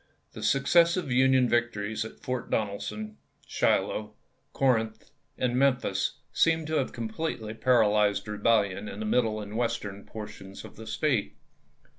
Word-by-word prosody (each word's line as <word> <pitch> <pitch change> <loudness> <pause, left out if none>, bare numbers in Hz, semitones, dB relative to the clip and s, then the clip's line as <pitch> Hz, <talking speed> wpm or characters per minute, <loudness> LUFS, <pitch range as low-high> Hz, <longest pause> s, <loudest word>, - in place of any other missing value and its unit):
The - - -9
successive 170 +3 +3
Union 130 0 +4
victories 110 -3 0
at 110 - -10
Fort 125 -1 -4
Donelson, 115 - -3 0.3
Shiloh, - - 0 0.4
Corinth, 115 -5 0 0.3
and 125 -1 0
Memphis 130 -1 +1 0.2
seemed 165 -1 +3
to 155 0 -1
have 135 - 0
completely 115 -1 -4
paralyzed 105 -4 +3
rebellion 105 -1 +1
in 100 - -8
the 110 - -3
middle 110 -1 +1
and 105 0 -7
western 100 -4 -2
portions 100 -3 -9
of - - -12
the 110 0 -10
State. 105 - 0
115 Hz, 130 wpm, -28 LUFS, 105-130 Hz, 0.4 s, Union